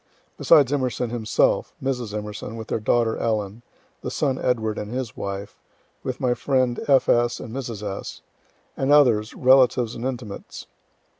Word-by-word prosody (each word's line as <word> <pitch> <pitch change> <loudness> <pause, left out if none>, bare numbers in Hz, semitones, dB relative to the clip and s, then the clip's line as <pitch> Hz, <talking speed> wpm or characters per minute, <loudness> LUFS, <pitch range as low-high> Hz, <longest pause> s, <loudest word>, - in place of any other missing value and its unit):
Besides 140 -2 +5
Emerson 125 -3 -1
himself, 110 -3 +1
Mrs. 125 -5 -3
E., 105 +1 -6
with 110 -1 -8
their - - -1
daughter 115 +1 +1
Ellen, 110 -1 -2 0.4
the - - -4
son 135 -3 -1
Edward 110 -3 0
and 105 +1 -6
his 125 -2 -4
wife, 100 +1 -6 0.4
with 130 -1 -4
my 125 -3 +2
friend 130 -2 0
F. 135 -2 +4
S. 120 0 +2
and 115 - -8
Mrs. 115 -6 -5
S., 100 -1 -6 0.5
and 135 +1 0
others, 120 -7 +4
relatives 125 -2 +4
and 115 - -7
intimates. 125 -6 -6
120 Hz, 150 wpm, -23 LUFS, 110-130 Hz, 0.5 s, Besides